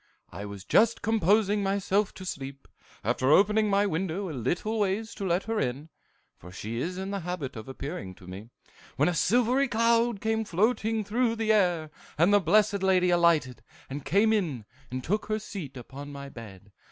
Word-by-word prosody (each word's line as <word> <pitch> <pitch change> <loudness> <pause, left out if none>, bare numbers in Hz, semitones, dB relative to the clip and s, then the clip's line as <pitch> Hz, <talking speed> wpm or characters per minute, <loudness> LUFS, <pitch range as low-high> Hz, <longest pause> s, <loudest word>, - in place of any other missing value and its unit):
I 100 - -7
was 100 -1 -9
just 230 +1 +3
composing 210 0 +2
myself 200 +1 +1
to 190 - -9
sleep, 140 -5 -7 0.4
after 125 +4 +1
opening 210 +6 +4
my 200 +1 +3
window 185 0 -2
a - - -6
little 175 - -2
ways 205 +2 -1
to 195 - -4
let 175 +2 +1
her 225 -1 -2
in, 135 +3 -3 0.5
for 90 - -12
she 110 +4 -5
is 180 +4 -3
in 190 +1 -4
the 200 - -2
habit 170 -7 -5
of 110 +1 -8
appearing 130 - -6
to 90 - -16
me, 95 +5 -9 0.5
when 145 +3 +3
a 180 - +1
silvery 245 - +2
cloud 230 -1 +2
came 220 +1 0
floating 220 +3 0
through 230 +3 0
the 220 -1 +2
air, 175 -7 +1 0.3
and 170 +6 +4
the 205 - +7
Blessed 200 +3 +3
Lady 185 -2 +3
alighted, 165 -9 +2 0.4
came 210 +8 +3
in, 155 - -1 0.2
and 130 0 -5
took 210 +9 -1
her 215 0 0
seat 185 -10 -7
upon 140 +4 -9
my 140 0 -8
bed. 100 -5 -12
185 Hz, 180 wpm, -28 LUFS, 140-215 Hz, 0.5 s, the